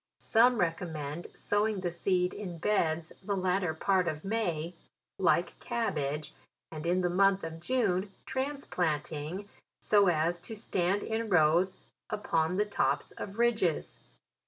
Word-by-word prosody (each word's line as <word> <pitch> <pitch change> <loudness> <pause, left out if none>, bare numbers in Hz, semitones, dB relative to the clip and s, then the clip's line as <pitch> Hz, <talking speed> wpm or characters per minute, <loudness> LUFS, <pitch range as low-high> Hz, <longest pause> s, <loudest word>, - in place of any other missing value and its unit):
Some 240 +2 +4
recommend 165 -3 -2
sowing 205 -1 0
the 175 -2 -1
seed 180 +1 +1
in 185 -5 -6
beds 165 -3 0
the 200 +1 -1
latter 180 -2 0
part 185 +2 +2
of 155 0 -3
May, 180 -6 -1 0.5
like - - +2
cabbage, 150 - -2 0.4
and 155 +1 -5
in 180 +2 +2
the 180 - +2
month 195 +1 +3
of 165 0 -5
June 195 -2 0
transplant 260 - -1
ing, 160 +7 -5 0.3
so 205 -2 +4
as 170 +1 +2
to 220 +5 -5
stand 195 -1 0
in 225 0 -2
rows 175 +1 +4 0.3
upon 170 -5 0
the 210 - +3
tops 205 - 0
of 200 +1 -7
ridges. 230 -9 +1
180 Hz, 135 wpm, -30 LUFS, 165-205 Hz, 0.5 s, Some